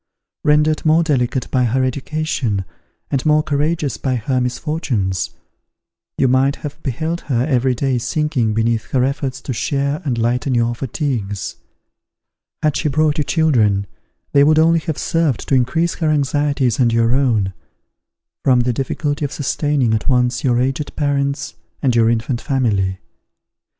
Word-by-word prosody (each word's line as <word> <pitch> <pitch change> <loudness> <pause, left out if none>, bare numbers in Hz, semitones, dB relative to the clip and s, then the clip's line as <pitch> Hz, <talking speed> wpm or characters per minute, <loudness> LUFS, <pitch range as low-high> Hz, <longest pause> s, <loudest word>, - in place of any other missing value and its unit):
Rendered 150 +1 +3
more 160 +1 +4
delicate 130 -4 0
by 125 -2 +2
her 130 +3 +1
education, 130 -6 -2 0.5
and 135 -2 0
more 155 0 +3
courageous 150 0 -1
by 130 -2 -1
her 125 +2 -1
misfortunes, 125 - -2 0.9
you 130 - +3
might 130 +3 +3
have 150 +1 -8
beheld 160 +6 -3
her 125 -3 +1
every 130 -3 +1
day 130 0 0
sinking 125 -3 0
beneath 115 0 +1
her 130 -2 +3
efforts 135 -1 -2
to 130 - -4
share 140 +4 -1
and 130 -6 -1
lighten 125 +3 0
your 120 0 +1
fatigues. 120 - -3 1.1
Had 150 -2 +2
she 150 - 0
brought 155 +1 +1
you - - +2
children, 115 - +2 0.5
they 140 - +5
would 155 +2 +4
only 165 +1 +4
have 160 -3 -4
served 155 -2 0
to - - 0
increase 135 +7 +2
her 160 -2 -1
anxieties 145 -3 +1
and 120 -2 +3
your 115 +1 +2
own, 115 -8 +1 0.9
from 125 -2 +4
the 120 0 0
difficulty 145 +4 -2
of 140 - -2
sustaining 145 -4 0
at 110 - -1
once 125 -1 +1
your 120 -2 +2
aged 135 +3 -2
parents 140 -1 -1 0.3
and 130 -4 +2
your 115 -1 +4
infant 115 +1 -1
family. 100 -9 0
135 Hz, 150 wpm, -19 LUFS, 120-150 Hz, 1.1 s, they